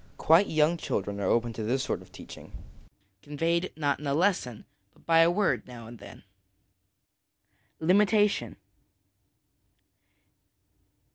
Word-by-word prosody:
Quite 170 Hz, +6 st, +4 dB
young 155 Hz, +2 st, +1 dB
children 100 Hz, -, -4 dB
are 100 Hz, -, -2 dB
open 120 Hz, 0 st, 0 dB
to 110 Hz, -, -7 dB
this 125 Hz, +5 st, -1 dB
sort -, -, -3 dB
of -, -, -18 dB
teaching, -, -, -12 dB, 0.7 s
conveyed, 165 Hz, +5 st, -2 dB
not 145 Hz, -2 st, -1 dB
in 150 Hz, -, -6 dB
a 140 Hz, -, 0 dB
lesson, 155 Hz, -, -1 dB, 0.3 s
but -, -, -26 dB
by 165 Hz, 0 st, +4 dB
a 165 Hz, +1 st, +5 dB
word 195 Hz, +2 st, 0 dB
now 120 Hz, -2 st, -11 dB
and 115 Hz, 0 st, -12 dB
then. -, -, -13 dB, 1.6 s
Limitation. 205 Hz, +4 st, +2 dB
155 Hz, 125 wpm, -27 LUFS, 120-175 Hz, 1.6 s, a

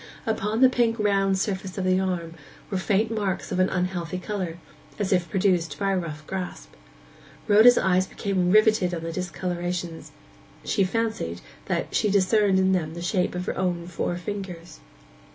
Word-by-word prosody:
Upon 220 Hz, 0 st, -1 dB
the 260 Hz, -, +9 dB
pink 235 Hz, -2 st, +1 dB
round 195 Hz, -2 st, +2 dB
surface 190 Hz, -1 st, -3 dB
of 190 Hz, -, -1 dB
the 185 Hz, 0 st, +3 dB
arm 175 Hz, -3 st, -2 dB, 0.4 s
were 190 Hz, -, 0 dB
faint 210 Hz, +3 st, +1 dB
marks 205 Hz, -4 st, -2 dB
of 185 Hz, -, -1 dB
an 185 Hz, -, +3 dB
unhealthy 180 Hz, -1 st, -2 dB
colour, 185 Hz, -3 st, -4 dB, 0.4 s
as 200 Hz, -2 st, 0 dB
if 175 Hz, -3 st, +1 dB
produced 180 Hz, -2 st, +1 dB
by 195 Hz, -1 st, 0 dB
a 190 Hz, -, +1 dB
rough 155 Hz, -3 st, -7 dB
grasp. 185 Hz, 0 st, -6 dB, 0.8 s
Rhoda's 220 Hz, +4 st, +7 dB
eyes 185 Hz, 0 st, +2 dB
became 190 Hz, -3 st, -1 dB
riveted 215 Hz, -3 st, +4 dB
on 165 Hz, -, -6 dB
the 165 Hz, -, -3 dB
discolorations; 175 Hz, -1 st, -4 dB, 0.5 s
she 200 Hz, -, +2 dB
fancied 190 Hz, -, -2 dB, 0.3 s
that -, -, -2 dB
she 210 Hz, -, +2 dB
discerned 200 Hz, 0 st, +3 dB
in 190 Hz, 0 st, +3 dB
them 165 Hz, -4 st, -1 dB
the 170 Hz, -, -6 dB
shape 180 Hz, 0 st, 0 dB
of 180 Hz, 0 st, -3 dB
her -, -, -2 dB
own 180 Hz, -2 st, -1 dB
four 175 Hz, 0 st, -3 dB
fingers. 180 Hz, -4 st, -7 dB
185 Hz, 170 wpm, -25 LUFS, 175-205 Hz, 0.8 s, the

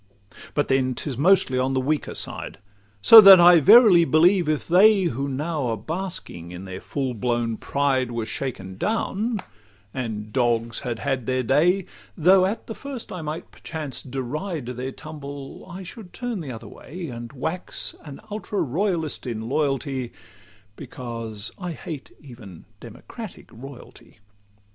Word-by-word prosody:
But 145 Hz, -, +1 dB
then 130 Hz, -1 st, +1 dB
'tis 140 Hz, 0 st, -4 dB
mostly 155 Hz, -3 st, +3 dB
on 130 Hz, +1 st, 0 dB
the -, -, +2 dB
weaker 145 Hz, +3 st, -2 dB
side; -, -, -3 dB, 0.5 s
So 225 Hz, -1 st, +11 dB
that 195 Hz, -2 st, +10 dB
I 175 Hz, 0 st, +8 dB
verily 200 Hz, -, +7 dB
believe 170 Hz, +1 st, +3 dB
if 155 Hz, -2 st, -1 dB
they 195 Hz, +3 st, +5 dB
Who 140 Hz, -4 st, -2 dB
now 145 Hz, 0 st, -2 dB
are 115 Hz, -1 st, -1 dB
basking 155 Hz, -, -5 dB
in 90 Hz, +2 st, -8 dB
their 95 Hz, 0 st, -7 dB
full 135 Hz, -3 st, -3 dB
blown 120 Hz, 0 st, -1 dB
pride 135 Hz, -1 st, 0 dB
Were 115 Hz, -2 st, -3 dB
shaken 105 Hz, -5 st, -5 dB
down, 215 Hz, +1 st, -1 dB, 0.5 s
and 110 Hz, -4 st, -5 dB
'dogs 115 Hz, -2 st, 0 dB
had 120 Hz, -4 st, -4 dB
had 135 Hz, -2 st, -2 dB
their 130 Hz, 0 st, 0 dB
day,' 170 Hz, +9 st, +2 dB, 0.3 s
Though 185 Hz, +3 st, +5 dB
at 215 Hz, +3 st, -4 dB
the 225 Hz, -, -6 dB
first 270 Hz, -1 st, -8 dB
I 180 Hz, -, -5 dB
might 155 Hz, +1 st, -6 dB
perchance 155 Hz, -5 st, -6 dB
deride 140 Hz, +5 st, -4 dB
Their 125 Hz, +2 st, -5 dB
tumble, 145 Hz, -1 st, -9 dB
I 185 Hz, +2 st, -8 dB
should 185 Hz, 0 st, -11 dB
turn 245 Hz, -6 st, -4 dB
the 140 Hz, -5 st, -6 dB
other 115 Hz, -, -9 dB
way, 175 Hz, +4 st, -9 dB
And 120 Hz, -1 st, -8 dB
wax 160 Hz, +7 st, -4 dB
an 145 Hz, -3 st, -10 dB
ultra 210 Hz, -1 st, -4 dB
royalist 160 Hz, 0 st, -1 dB
in 110 Hz, -2 st, -4 dB
loyalty, 135 Hz, -3 st, -1 dB, 0.6 s
Because 115 Hz, -4 st, -6 dB
I 180 Hz, -2 st, -4 dB
hate 155 Hz, -2 st, -8 dB
even 115 Hz, -, -13 dB
democratic -, -, -10 dB
royalty. 130 Hz, +2 st, -13 dB
140 Hz, 150 wpm, -23 LUFS, 125-175 Hz, 0.6 s, So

